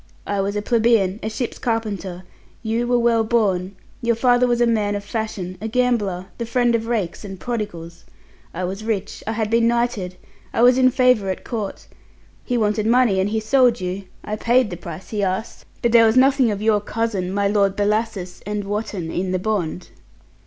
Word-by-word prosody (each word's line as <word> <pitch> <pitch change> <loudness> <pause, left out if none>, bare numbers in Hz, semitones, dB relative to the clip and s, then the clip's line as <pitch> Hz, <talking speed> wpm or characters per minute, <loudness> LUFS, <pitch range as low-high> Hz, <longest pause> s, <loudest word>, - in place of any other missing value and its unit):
I 200 -1 -1
was 200 +1 -2
a 205 - -2
plebeian, 225 -4 +2
a 220 - -2
ship's 235 +2 -4
carpenter; 200 -6 -3 0.4
you 230 +2 -1
were 245 0 +3
well 235 -1 +3
born, 200 -5 0 0.3
your 235 0 +1
father 245 +1 +3
was 240 -1 +1
a 240 - +4
man 210 -3 +1
of 200 - -4
fashion, 205 -4 -4
a 220 - -3
gambler, 220 -7 0
the 235 - -2
friend 240 0 +2
of 225 -1 0
rakes 215 -8 -2
and 195 -2 -8
prodigals. 175 -8 -5 0.5
I 180 - -5
was 195 +4 -4
rich. 210 -2 -3
I 220 - -1
had 220 -1 -2
been 230 0 +4
knighted. 235 -6 0 0.4
I 230 - +2
was 250 +1 +6
in 255 0 +6
favour 250 -6 +3
at 185 - -4
Court. 215 -4 -4 0.6
He 245 - -1
wanted 215 -1 +1
money, 235 -5 +4
and 190 +2 +1
he 220 +1 0
sold 240 +1 +3
you. 185 +2 -4 0.2
I 215 0 -4
paid 240 0 +2
the - - -3
price 170 0 -9
he 210 -2 -1
asked, 190 +3 -3 0.2
but 235 - +3
there 230 -1 +7
was 220 +3 +2
nothing 265 -1 +5
of 205 0 -3
your 215 -2 +3
cousin, 205 -4 -2
my 200 +1 +1
Lord 200 -1 +2
Bellasis 205 -3 -1
and 210 0 -3
Wotton, 200 -4 -3
in 185 +1 -2
the - - +2
bond." 180 -3 -2
215 Hz, 195 wpm, -21 LUFS, 195-235 Hz, 0.6 s, there